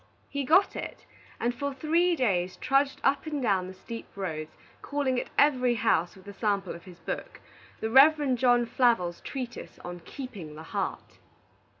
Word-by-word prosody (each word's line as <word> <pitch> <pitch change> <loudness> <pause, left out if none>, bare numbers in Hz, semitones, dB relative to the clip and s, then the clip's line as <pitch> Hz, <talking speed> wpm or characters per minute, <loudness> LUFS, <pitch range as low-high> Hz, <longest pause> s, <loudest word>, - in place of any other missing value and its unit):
He 280 -1 -2
got 365 +9 +4
it, - - -6 0.3
and 240 +1 0
for 280 +2 -3
three 335 +5 +2
days 185 - 0
trudged 275 +1 +1
up 275 +3 +2
and 300 -2 -2
down 195 -7 +1
the 185 - -8
steep 230 +4 -8
roads, 155 -5 -4 0.3
calling 275 -3 0
at - - -5
every 255 -4 +4
house 220 -7 +1
with 190 +1 -16
a 200 - -7
sample 200 -1 -1
of 170 - -11
his 180 -2 -12
book, - - -5 0.4
the 220 - -1
Rev. 285 +1 +6
John 245 -1 +4
Flavel's 230 -9 +2
treatise 250 -3 -6
on 175 0 -6
"Keeping 190 - -8
the 155 - -9
Heart." - - -4
240 Hz, 170 wpm, -28 LUFS, 185-275 Hz, 0.4 s, Rev